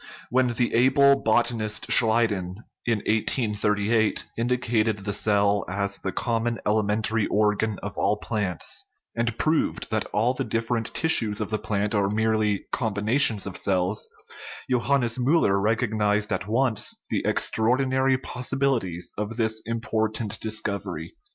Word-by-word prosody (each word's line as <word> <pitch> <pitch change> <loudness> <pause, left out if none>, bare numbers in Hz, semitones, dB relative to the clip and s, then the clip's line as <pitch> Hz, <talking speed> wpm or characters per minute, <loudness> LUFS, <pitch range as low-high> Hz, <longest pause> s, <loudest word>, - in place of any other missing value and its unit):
When 130 +1 +3
the 120 0 0
able 140 +3 +4
bot 110 +2 +3
anist 110 -2 -3
Schleiden, 110 -6 +2 0.3
in 115 -4 0
1838, 105 -1 +1
indicated 115 -2 0
the 100 0 -4
cell 100 0 +2
as 100 +1 -1
the 95 - -3
com 115 +3 -1
mon 120 -1 -1
elementary 110 +1 +1
organ 105 0 +1
of 100 0 -5
all 105 - +1
plants, 105 -5 -3 0.3
and 115 -1 -1
proved 155 0 0
that - - 0
all 115 +5 0
the - - -3
different 115 0 -2
tissues 115 -10 +2
of 105 -1 -4
the 110 - -1
plant 105 0 -1
are 100 -2 +1
merely 110 -1 0
combi 105 -5 -2
nations 110 -2 +2
of 95 -3 -6
cells, 95 +2 0 0.6
Johannes 125 -1 +1
Miiller 125 -7 +2
recognized 105 -1 0
at 95 +2 -3
once 115 0 +1
the - - 0
extraordinary 130 +3 +2
possibilities 125 -9 -2
of 105 +2 -4
this 110 -1 0
important 110 -2 -2
discovery. 105 - -3
110 Hz, 135 wpm, -25 LUFS, 105-120 Hz, 0.6 s, able